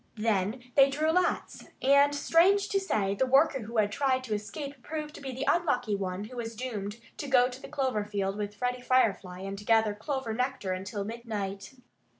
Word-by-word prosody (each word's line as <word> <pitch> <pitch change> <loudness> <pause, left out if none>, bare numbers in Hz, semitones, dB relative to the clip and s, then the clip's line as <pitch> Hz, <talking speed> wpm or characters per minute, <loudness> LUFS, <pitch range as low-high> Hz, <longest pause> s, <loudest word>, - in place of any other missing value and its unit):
Then 215 +2 0
they 275 -1 +6
drew 305 +3 +1
lots. 360 +2 0
And 280 +2 +5
strange 360 +7 +4
to 395 - +2
say, 205 - 0
the 260 +6 0
worker 270 +1 +4
who 230 0 -6
had 205 -1 +3
tried 260 +2 +1
to 230 -4 -3
escape 275 +6 -5
proved 305 +2 -5
to - - -10
be 270 -1 -5
the 255 +1 -4
unlucky 250 -11 +2
one 190 0 -3
who 245 +4 -9
was 230 -1 -4
doomed 215 -3 -5 0.2
to 290 - -5
go 250 -2 +5
to 255 +1 -9
the - - -8
clover 260 -7 0
field 200 -2 -2
with 205 0 -4
Freddie 250 +2 -2
Firefly 200 -8 +1
and 195 +1 -6
gather 220 -1 +3
clover 240 +2 -3
nectar 250 -4 -2
until 195 +2 -4
midnight. 215 -1 -5
245 Hz, 190 wpm, -29 LUFS, 205-275 Hz, 0.2 s, they